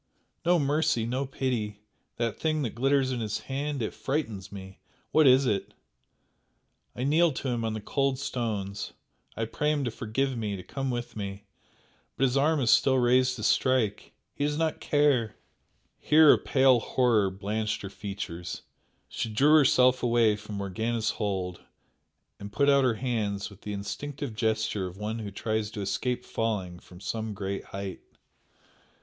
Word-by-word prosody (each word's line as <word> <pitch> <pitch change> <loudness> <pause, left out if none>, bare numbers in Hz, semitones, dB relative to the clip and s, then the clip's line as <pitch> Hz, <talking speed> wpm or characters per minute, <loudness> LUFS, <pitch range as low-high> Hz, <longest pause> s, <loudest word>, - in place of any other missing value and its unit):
"No 175 +1 +4
mercy, 145 -5 +1
no 130 +3 -2
pity! 110 -6 -3 0.3
That 115 -2 -2
thing 155 -2 0
that 115 - -3
glitters 135 +2 +2
in 125 - -2
his 110 -2 -3
hand 140 -1 -3
it 110 - -3
frightens 110 -9 -3
me 95 -1 -10 0.3
what 155 -2 +5
is 130 +1 +6
it? 100 -5 -1 1.2
I 125 - -3
kneel 160 +4 +4
to 130 - -3
him 120 -2 -1
on 110 -1 -1
the 110 - -5
cold 135 +4 0
stones 105 -6 -3 0.4
I 115 - 0
pray 150 +6 0
him 145 -2 0
to 120 - -1
forgive 130 +5 -2
me 105 -3 -2
to 90 - -8
come 135 +5 -4
with 120 -1 -4
me 100 -1 -6 0.7
but - - 0
his 130 -1 +2
arm 150 +3 +3
is 120 - +3
still 135 - +5
raised 125 0 +3
to 110 - -7
strike 115 -3 +1 0.2
he - - -3
does 150 0 0
not 160 -1 0
care 140 -7 +2 0.3
!" - - -44
Here 155 0 +7
a - - +3
pale 130 -2 +4
horror 115 -5 +2
blanched 105 +3 -3
her 100 - -5
features 95 -4 -6 0.4
she 115 - -3
drew 140 +8 +4
herself 130 -4 +5
away 115 -3 +3
from 105 0 -8
Morgana's 110 +4 -1
hold 95 -3 -3 0.8
and 100 0 -8
put 140 +6 +2
out 140 -1 +4
her 125 -3 +2
hands 110 -5 -2
with 100 - -15
the 105 - -5
instinctive 140 +6 -5
gesture 110 -3 0
of 90 +1 -10
one 110 +2 -3
who 105 -2 -5
tries 110 +1 -2
to 105 - -6
escape 120 +6 -2
falling 95 -6 -2
from 90 0 -15
some 110 +1 -4
great 95 0 -4
height. 95 -2 -6
115 Hz, 170 wpm, -28 LUFS, 105-135 Hz, 1.2 s, Here